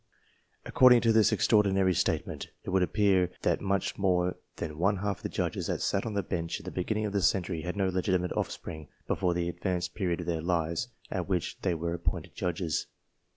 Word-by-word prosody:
According 125 -2 +6
to 115 -1 +3
this 110 -1 +5
extraordinary 95 -3 +3
statement, - - -1 0.2
it - - -5
would 95 0 +3
appear 95 -1 +3
that - - +1
much 100 0 -1
more 90 -2 +2 0.2
than 75 0 -5
one 100 +3 +2
half 100 0 -2
of - - -20
the - - -3
judges - - -2
that - - -1
sat 100 +4 0
on 110 - -4
the 100 - 0
Bench 85 -2 -3
in - - -13
the - - -6
beginning 105 +4 -1
of 105 - -3
this 100 -3 +4
century, 90 -3 -1
had 90 +3 -4
no 95 -1 +2
legitimate 90 -1 0
offspring 80 -2 -4 0.2
before 90 -2 0
the 85 -1 0
advanced 90 0 -2
period 90 -5 -1
of - - -6
their 85 -2 -1
lives 85 +3 0 0.2
at 90 0 -3
which 90 -4 -2
they 90 -3 +1
were 85 +1 -2
appointed 85 0 -3
judges. 85 -2 -2
90 Hz, 200 wpm, -29 LUFS, 85-100 Hz, 0.2 s, According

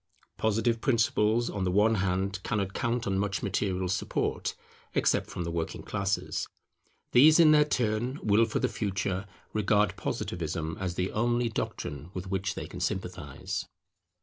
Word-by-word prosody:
Positive 115 +1 +1
principles, 115 -2 +2
on 100 - -2
the 90 - +1
one 105 +4 +4
hand, 95 +1 -1
cannot 100 -2 -1
count 120 -1 -1
on 95 -1 0
much 100 0 -1
material 95 -1 0
support, 90 - -1 0.4
except - - +2
from 90 - -4
the 85 - -3
working 85 -1 -3
classes; 100 0 -1 0.6
these 155 +6 +7
in 160 -2 +8
their 150 -1 +7
turn 120 0 0
will 105 +2 +4
for 110 - -2
the - - +2
future 100 -2 -2 0.3
regard 105 0 +2
Positivism 80 -1 -3
as 90 -3 -2
the 90 +2 -1
only 120 +2 +1
doctrine 75 - -4
with 90 0 -4
which 95 -1 -1
they - - -4
can - - -8
sympathize. 85 -7 -3
100 Hz, 150 wpm, -29 LUFS, 95-115 Hz, 0.6 s, in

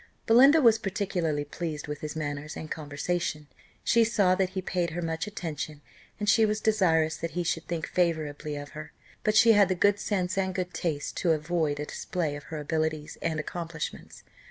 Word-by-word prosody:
Belinda 270 +7 +7
was 225 -2 +6
particularly 180 -7 -1
pleased 155 -1 -5
with 150 0 -5
his 155 0 -5
manners 145 0 -4
and 155 - -7
conversation; 150 +1 -2 0.4
she 235 - +4
saw 205 -5 +3
that 185 0 +1
he - - +2
paid 175 -1 -1
her 170 +2 -4
much 165 +3 -2
attention, 155 -6 -5 0.4
and 210 - -2
she 225 +2 +5
was 215 0 +1
desirous 165 -8 +2
that 165 - -4
he 175 - +1
should 165 -1 -2
think 170 -2 -2
favourably 155 -4 -1
of 145 0 -6
her; 155 0 -9 0.3
but 215 0 +2
she 230 +1 +7
had 205 -3 +5
the 185 - +1
good 205 +3 +3
sense 190 -2 -1
and 190 -1 -1
good 180 -1 -3
taste 155 -4 -3
to 170 -3 +3
avoid 155 -1 -1
a 150 - -2
display 155 -1 -3
of 145 0 -9
her 160 - -6
abilities 155 0 -2
and 160 -2 -1
accomplishments. 165 0 -6
165 Hz, 190 wpm, -28 LUFS, 155-190 Hz, 0.4 s, Belinda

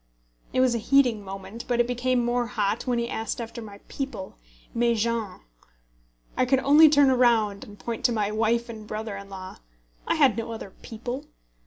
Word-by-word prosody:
It 255 - +2
was 255 -2 +4
a 235 - 0
heating 245 -3 +3
moment, 195 +4 -8
but 240 -1 0
it 240 - +4
became 245 0 0
more 240 0 0
hot 215 0 -1
when 245 -1 +1
he 235 0 -1
asked 225 -1 -3
me 235 - -3
after 230 +1 -8
my 205 -2 -10
people, 270 -9 -5 0.4
"mes 235 -1 +2
gens." 225 -3 -2 0.9
I - - +2
could 260 +2 +3
only 300 +3 +7
turn 285 -2 +5
round, 225 -5 +3
and 205 -1 -12
point 230 +1 -5
to - - +4
my 210 -2 0
wife 225 +2 +1
and 220 -2 -9
brother 215 -1 -4
in 200 0 -9
law. 190 -1 -8 0.5
I - - +2
had 270 -9 +4
no 230 0 -3
other 210 -3 -8
"people." 245 +5 -6
235 Hz, 195 wpm, -26 LUFS, 215-245 Hz, 0.9 s, only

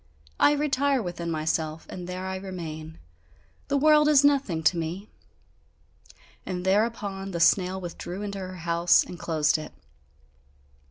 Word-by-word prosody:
I 290 - +5
retire 285 -2 +1
within 175 -5 -4
myself, 155 0 -2
and 180 -1 -8
there 185 +1 -5
I 190 0 -3
remain. 160 -4 -7 0.7
The 280 - +1
world 300 +1 +5
is 290 -2 +5
nothing 270 - +2
to 155 - +4
me!" 170 +5 -5 1.3
And 180 -1 -5
thereupon 200 -1 0
the 175 -3 -4
snail 185 +2 +3
withdrew 180 +2 -6
into 200 -1 -5
her 185 -1 -6
house 170 0 +3
and 175 - -10
closed 155 -2 +1
it. 155 - -9
185 Hz, 140 wpm, -26 LUFS, 170-210 Hz, 1.3 s, I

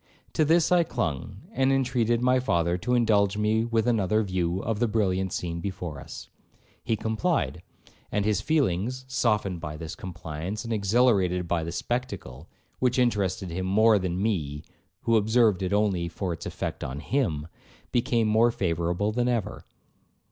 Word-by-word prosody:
To 155 - +3
this 165 +3 +3
I 175 -1 +5
clung, 95 - -3
and 135 +1 +2
intreated 125 -3 +1
my 125 0 +4
father 85 -8 +1
to 125 +8 0
indulge 105 -4 +3
me 110 +1 +2
with 115 -1 0
another 110 -3 +2
view 90 -2 -1
of 110 -2 -2
the 120 - +2
brilliant 95 -4 0
scene 85 -1 -3
before 90 -6 -5
us. - - -9 0.6
He 115 - 0
complied, 110 - -1 0.5
and 105 -1 0
his 105 -2 +1
feelings, 130 - 0
softened 105 -9 0
by 75 0 -5
this 80 +1 -6
compliance, 90 +3 -6
and 115 -1 -3
exhilarated 100 -4 +2
by 85 -1 0
the 85 - -4
spectacle, 100 - -4 0.3
(which 125 -1 +1
interested 100 -7 0
him 95 +2 -3
more 110 +2 +5
than 90 -1 -2
me, 80 -9 -1 0.4
who 115 -1 +3
observed 110 -2 +3
it 95 0 -1
only 100 -4 +1
for 90 +1 -3
its - - -7
effect - - -4
on 65 +3 -4
him), 80 - -1 0.4
became 120 -2 +2
more 110 +2 +4
favourable 90 0 -1
than 120 +2 0
ever. 120 -5 -2
105 Hz, 160 wpm, -26 LUFS, 90-120 Hz, 0.6 s, I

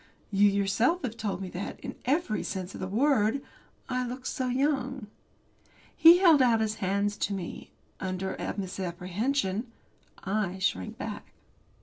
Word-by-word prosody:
You 205 +1 +5
yourself 200 - +1
have 235 -3 -3
told 205 -4 -3
me 185 - -5
that, 185 +2 -6
in - - -5
every 270 -4 +1
sense 185 -2 -4
of - - -8
the 185 - -2
word, 225 +2 +2 0.5
I 255 -1 -1
look 250 +1 -6
so 255 - -2
young. 265 -1 0 0.9
He 335 +2 +9
held 335 -6 +6
out 235 -3 +4
his 220 -1 -1
hands 200 +2 0
to 200 - -1
me 180 -3 -6 0.3
under 190 0 -3
a - - -4
misapprehension. 190 +5 -2 0.5
I 195 -2 -1
shrank 95 - -1
back. - - -7
210 Hz, 145 wpm, -28 LUFS, 190-255 Hz, 0.9 s, He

